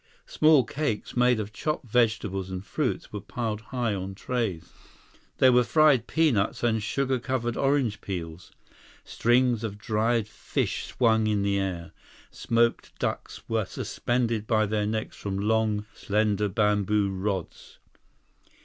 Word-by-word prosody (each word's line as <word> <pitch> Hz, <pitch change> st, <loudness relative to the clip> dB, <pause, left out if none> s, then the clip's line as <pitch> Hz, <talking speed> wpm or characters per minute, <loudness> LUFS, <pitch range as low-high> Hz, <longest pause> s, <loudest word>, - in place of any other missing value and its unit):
Small 155 Hz, -3 st, +4 dB
cakes 135 Hz, -3 st, -3 dB
made 125 Hz, -1 st, +3 dB
of 105 Hz, 0 st, -5 dB
chopped 150 Hz, +1 st, -3 dB
vegetables 110 Hz, -5 st, 0 dB
and 95 Hz, +1 st, -6 dB
fruits 145 Hz, -2 st, -2 dB
were 105 Hz, -, -4 dB
piled 110 Hz, -1 st, -4 dB
high 120 Hz, -2 st, -2 dB
on 95 Hz, 0 st, -5 dB
trays. 105 Hz, -7 st, -3 dB, 0.7 s
There 130 Hz, -, +6 dB
were 125 Hz, 0 st, +5 dB
fried 150 Hz, -3 st, +4 dB
peanuts 130 Hz, -13 st, +1 dB
and 110 Hz, -2 st, +2 dB
sugar 130 Hz, +4 st, -1 dB
covered 120 Hz, -1 st, -2 dB
orange 135 Hz, -6 st, +1 dB
peels. 85 Hz, -2 st, -6 dB, 0.5 s
Strings 120 Hz, -1 st, +2 dB
of 105 Hz, -2 st, -4 dB
dried 110 Hz, +1 st, 0 dB
fish 110 Hz, -, -3 dB
swung 110 Hz, -3 st, +2 dB
in 105 Hz, -2 st, +1 dB
the 100 Hz, 0 st, +1 dB
air. 90 Hz, -4 st, -3 dB, 0.4 s
Smoked 115 Hz, 0 st, 0 dB
ducks -, -, -4 dB
were 115 Hz, -1 st, 0 dB
suspended 115 Hz, +1 st, -2 dB
by 110 Hz, -2 st, +3 dB
their 105 Hz, 0 st, -1 dB
necks 110 Hz, 0 st, -3 dB
from 100 Hz, -1 st, -4 dB
long, 105 Hz, 0 st, +1 dB
slender 105 Hz, 0 st, 0 dB
bamboo 105 Hz, 0 st, +1 dB
rods. 95 Hz, -1 st, -4 dB
110 Hz, 135 wpm, -27 LUFS, 100-120 Hz, 0.7 s, There